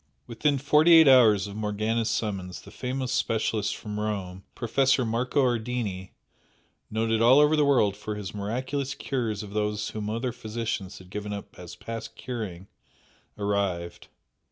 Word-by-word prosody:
Within 140 +5 0
forty 150 +5 +5
eight 160 -2 +8
hours 115 -7 +6
of 100 -1 -8
Morgana's 110 +2 -1
summons 95 -5 -3
the 100 - -13
famous 130 +2 -3
specialist 110 -3 0
from 105 -1 -6
Rome, 95 -3 -4
Professor 130 +1 +2
Marco 125 +5 +1
Ardini, 115 -6 -2 0.8
noted 110 0 0
all 120 +4 +7
over 150 +1 +5
the 150 - +3
world 115 -8 +3
for 105 +1 -5
his 105 -2 -6
miraculous 130 +7 -3
cures 115 -6 -2
of 100 - -9
those 105 0 -1
whom 105 -1 -4
other 115 +3 -2
physicians 110 -4 -4
had 90 0 -15
given 105 0 -5
up 100 -1 -7
as 90 -2 -9
past 115 0 -7
curing, 105 -8 -6 0.7
arrived. 100 -4 -2
110 Hz, 150 wpm, -27 LUFS, 105-125 Hz, 0.8 s, eight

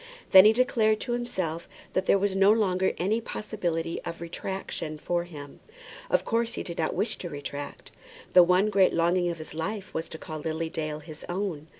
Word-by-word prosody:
Then 190 +1 +10
he 215 - +8
declared 220 -3 +2
to 245 - -3
himself 185 -9 -3 0.2
that 185 - 0
there - - +5
was 195 0 0
no 195 +1 +6
longer 190 -4 +2
any 215 +6 0
possibility 175 -8 -3
of 170 - -6
retractation 170 -2 -5
for 175 +3 -1
him. 145 -5 -10 0.5
Of - - +2
course 230 0 0
he - - -3
did 170 - -7
not 160 - 0
wish 220 - -1
to 175 - -5
retract. 145 -1 -7 0.4
The 180 - +9
one 180 +4 +4
great 195 -2 +4
longing 175 +1 +2
of 170 - -4
his 155 -1 -8
life 195 +5 -4
was 160 0 -3
to - - -6
call 155 0 -7
Lily 160 +1 -3
Dale 155 -3 -4
his 155 0 -10
own. 175 -5 -3
175 Hz, 195 wpm, -27 LUFS, 160-200 Hz, 0.5 s, Then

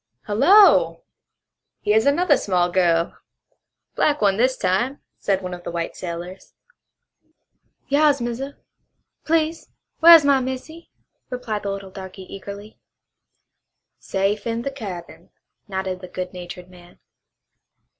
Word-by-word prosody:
"Hullo, 380 - +5 0.8
here's 220 +4 +3
another 295 +2 +4
small 180 -6 0
girl. 170 -2 +1 0.7
Black 295 -1 +1
one 200 -2 +2
this 255 +3 +2
time," 205 +9 0 0.2
said 195 -1 0
one 180 0 -5
of 175 0 -9
the - - -5
white 170 -1 -4
sailors. 175 +2 -8 1.3
"Yas, 285 0 +3
Massa! 245 +4 -5 0.7
Please 320 0 0 0.3
whar' 335 +1 +11
is 315 -3 +5
my 280 -1 +4
missy?" 260 +6 -6 0.4
replied 245 -5 -4
the 200 - -4
little 195 -1 -7
darky 190 0 -9
eagerly. 200 +3 -10 1.2
"Safe 200 +3 -1
in 230 0 -2
the 275 - -3
cabin," 200 -10 -9 0.4
nodded 190 -2 -4
the 185 - -8
good 180 0 -6
natured 180 0 -9
man. 180 -1 -17
205 Hz, 120 wpm, -22 LUFS, 185-275 Hz, 1.3 s, whar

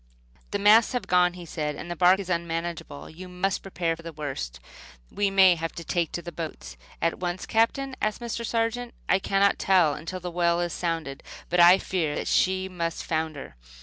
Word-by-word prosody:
"The 205 - -1
masts 215 +4 +5
have 250 - -2
gone," 180 -1 +3
he 175 -1 -9
said, 150 -2 -3
"and 175 - -7
the - - -3
bark 180 +2 +5
is 195 - -5
unmanageable. 170 -3 -3
You 180 +3 -10
must 180 +2 -1
prepare 170 -3 -2
for 165 - -13
the 165 0 -7
worst. 135 - -5 0.5
We 205 -1 +1
may 190 -2 +6
have 165 -1 -4
to 170 - -7
take 170 -1 -1
to 175 - -4
the 175 - -7
boats." 150 - -7 0.3
"At 165 - 0
once, 180 0 -3
Captain?" 260 +4 +1
asked 215 0 -1
Mr. 235 -1 -4
Sargent. 230 +1 -2
"I 195 - +3
cannot 195 +1 +2
tell 180 -6 +4
until 175 +5 -6
the 180 0 -6
well 170 0 +1
is 175 -1 -2
sounded; 165 -5 -3 0.3
but 180 - +2
I 175 +2 +8
fear 165 -6 -2
that - - -3
she 190 0 +2
must 170 -3 -3
founder." 155 - -3
175 Hz, 200 wpm, -26 LUFS, 165-195 Hz, 0.5 s, I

